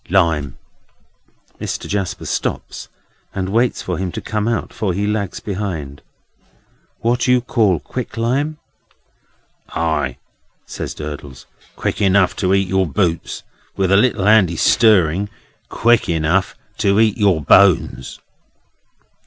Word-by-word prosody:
"Lime." 80 -8 +1 1.0
Mr. - - -4
Jasper 100 -3 -3
stops, - - -4 0.5
and 95 -1 -2
waits 115 +4 +1
for 90 -2 -3
him 95 -2 -2
to - - -4
come 105 0 -2
up, 115 -1 -2
for 95 -5 -2
he 100 +2 -1
lags 105 -2 -2
behind. 90 -9 -5 1.0
"What 120 +2 +1
you 125 0 +4
call 110 - +1
quick 125 +4 -6
lime?" 140 +7 0 1.2
"Ay!" 75 -6 -1 0.5
says - - -6
Durdles; 75 -4 -8 0.3
"quick - - -3
enough 95 -1 +3
to 95 -2 0
eat 95 -1 +1
your 95 0 +1
boots. 85 +2 -1 0.3
With 95 -1 +1
a - - +6
little 105 -2 +2
handy 100 -5 +4
stirring, 100 -1 +3 0.4
quick 120 0 +2
enough 85 +3 +1 0.2
to 100 +1 +3
eat 110 0 +2
your 100 -6 +3
bones." 75 -5 +3
95 Hz, 125 wpm, -19 LUFS, 85-110 Hz, 1.2 s, a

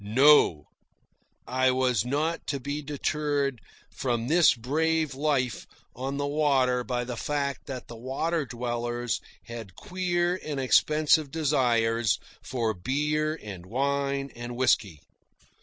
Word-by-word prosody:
No; 115 - +5 0.8
I 130 +1 +2
was 125 -4 +2
not 150 +6 -1
to 140 - -1
be 145 +3 -4
deterred 145 -2 -1 0.3
from 120 -2 -1
this 165 -3 +5
brave 155 +5 0
life 135 -5 -1 0.3
on 135 +3 -3
the 145 - -1
water 135 -4 +2
by 125 0 -2
the 125 0 -5
fact 140 +2 -2
that 130 -3 -6
the 120 - -9
water 140 +6 -2
dwellers 120 0 -2 0.2
had 115 -6 -9
queer 180 -2 -1
and 145 -3 -3
expensive 150 +3 +3
desires 120 -7 +2 0.2
for 115 -4 -1
beer 150 - -1
and 100 -4 -8
wine 140 +3 -1
and 120 0 -6
whisky. 105 - +1
135 Hz, 125 wpm, -27 LUFS, 120-150 Hz, 0.8 s, No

